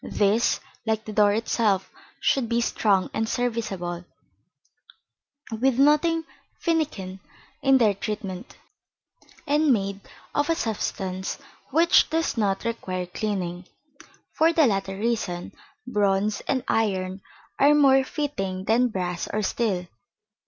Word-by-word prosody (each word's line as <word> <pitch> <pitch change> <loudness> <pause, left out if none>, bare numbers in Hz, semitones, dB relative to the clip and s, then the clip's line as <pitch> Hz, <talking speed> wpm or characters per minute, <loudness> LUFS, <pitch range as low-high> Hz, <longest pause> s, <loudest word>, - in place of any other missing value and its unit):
These, 210 +3 +2 0.2
like 220 -1 -1
the 215 - -6
door 205 -1 +5
itself, 215 -3 0 0.3
should 255 -4 +1
be 235 0 +2
strong 205 -5 +1
and 220 0 -1
serviceable, 205 -9 -2 1.5
with 245 +3 +1
nothing 300 +4 +4 0.4
finikin 280 - -1 0.4
in 270 -1 +5
their 220 -5 +4
treatment, 200 -2 -6 0.9
and 295 0 +3
made 200 -4 0 0.3
of 290 +2 0
a 330 - +3
substance 190 - -3 0.3
which 330 +4 +4
does 325 +1 0
not 205 -2 0
require 185 -6 -3
cleaning. 180 -2 -4 0.7
For 325 +1 +4
the 320 -2 +4
latter 195 -4 -1
reason, 205 -5 -2 0.3
bronze 205 -3 +1
and 260 -2 0
iron 190 -3 0 0.4
are 290 +2 +6
more 270 -2 +5
fitting 195 -11 -3
than 240 +4 +3
brass 180 -5 -3
or 215 0 -1
steel. 195 -4 -1
220 Hz, 115 wpm, -25 LUFS, 195-265 Hz, 1.5 s, are